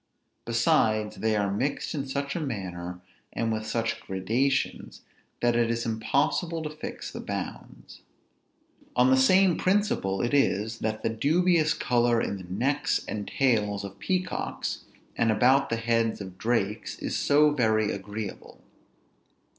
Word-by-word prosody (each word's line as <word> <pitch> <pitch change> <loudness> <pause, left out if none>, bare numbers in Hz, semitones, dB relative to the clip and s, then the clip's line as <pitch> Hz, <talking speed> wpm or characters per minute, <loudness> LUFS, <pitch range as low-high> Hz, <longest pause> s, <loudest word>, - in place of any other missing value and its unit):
Besides, 110 -2 +2
they 110 -1 +1
are 100 -1 0
mixed 135 +7 -2
in 140 -3 -3
such 140 +1 -3
a - - -1
manner, 90 - -5 0.3
and 115 -1 -1
with 110 0 -3
such 115 0 -1
gradations, 120 +9 -1 0.4
that 120 -1 +3
it 120 -1 +2
is 115 0 -1
impossible 145 +9 0
to 150 - -4
fix 155 - -7
the - - -7
bounds. - - -7 0.9
On 125 +1 +4
the - - +7
same 185 +7 +4
principle 185 - +1
it 120 - -1
is 110 -5 +1
that 110 0 -3
the - - +1
dubious 155 +7 +2
color 120 -1 +2
in 100 - -2
the 95 - -10
necks 140 +9 0
and 105 -1 -4
tails 105 -7 +1
of 100 0 -8
peacocks, 185 -1 -2 0.3
and 115 -1 +2
about 130 +5 +4
the 115 - 0
heads 115 -1 0
of 95 -3 -8
drakes, 110 -2 -1
is - - -3
so 150 +1 +4
very 110 -6 +2
agreeable. 105 +1 -7
115 Hz, 145 wpm, -27 LUFS, 110-140 Hz, 0.9 s, the